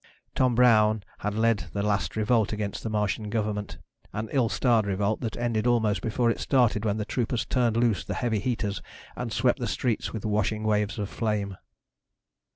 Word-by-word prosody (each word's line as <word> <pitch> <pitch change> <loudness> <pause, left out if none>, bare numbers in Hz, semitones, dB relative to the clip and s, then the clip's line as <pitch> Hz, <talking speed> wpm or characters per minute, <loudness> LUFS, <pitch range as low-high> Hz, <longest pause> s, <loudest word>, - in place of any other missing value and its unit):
Tom 125 -2 +2
Brown 110 -3 +4 0.2
had 105 0 -2
lead 115 -1 +2
the 100 - -1
last 105 -1 0
revolt 110 0 +2
against 105 -2 -3
the 115 - -4
Martian 105 0 -1
government, 105 -2 -2 0.4
an 110 +1 -4
ill 125 -5 +2
starred 115 -4 +2
revolt 100 +2 0
that 115 - -3
ended 120 -1 0
almost 110 -4 +2
before 115 +1 +1
it - - -4
started 120 -6 +2
when 105 0 +1
the 105 - -2
troopers 120 +1 -1
turned 120 -3 +1
loose 115 -8 +2
the - - -4
heavy 115 -3 0
heaters 110 -3 -2 0.3
and - - -4
swept - - +2
the - - -2
streets 120 -4 -1
with 110 -2 -5
washing 105 0 0
waves 105 -1 0
of 105 -2 -2
flame. 105 -3 -2
110 Hz, 180 wpm, -27 LUFS, 105-115 Hz, 0.4 s, Brown